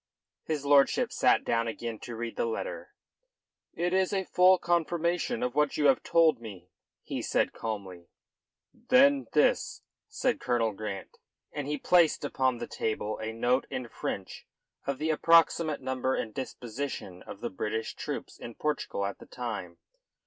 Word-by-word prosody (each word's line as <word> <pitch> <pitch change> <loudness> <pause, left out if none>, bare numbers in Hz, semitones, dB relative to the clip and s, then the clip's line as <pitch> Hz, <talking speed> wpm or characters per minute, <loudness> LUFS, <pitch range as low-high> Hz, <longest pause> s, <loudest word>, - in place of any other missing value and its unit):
His 150 -3 -2
lordship 140 -1 +4
sat - - +3
down 115 0 0
again 115 -1 -5
to 120 - -7
read 115 0 -5
the - - 0
letter. 115 - -5 0.8
"It 175 +2 -1
is 190 0 +2
a 195 -1 0
full 185 +1 +5
confirmation 175 +6 0
of 125 - -1
what 150 0 +1
you 150 - +1
have 135 -2 +5
told 160 -7 +3
me," 95 -5 -10 0.3
he - - -4
said - - +1
calmly. 95 -6 -6 0.7
"Then 270 +4 +4
this," - - +2 0.2
said 400 - -1
Colonel 120 -3 +1
Grant, 100 -1 -7 0.3
and 145 -2 -4
he 150 0 -1
placed 165 -1 +3
upon 130 -3 +1
the - - -4
table 110 -1 -3
a 110 0 -3
note 120 +3 +1
in 130 -2 -4
French 95 -3 -5 0.4
of 140 -1 -1
the 155 +3 0
approximate 165 -1 +4
number 130 0 -1
and 110 - -3
disposition 120 -7 -5
of - - -10
the - - -3
British 110 +4 -3
troops - - -6
in 115 - -8
Portugal 150 -9 -2
at 100 - -5
the - - -13
time. 105 -8 -5
130 Hz, 155 wpm, -29 LUFS, 110-165 Hz, 0.8 s, full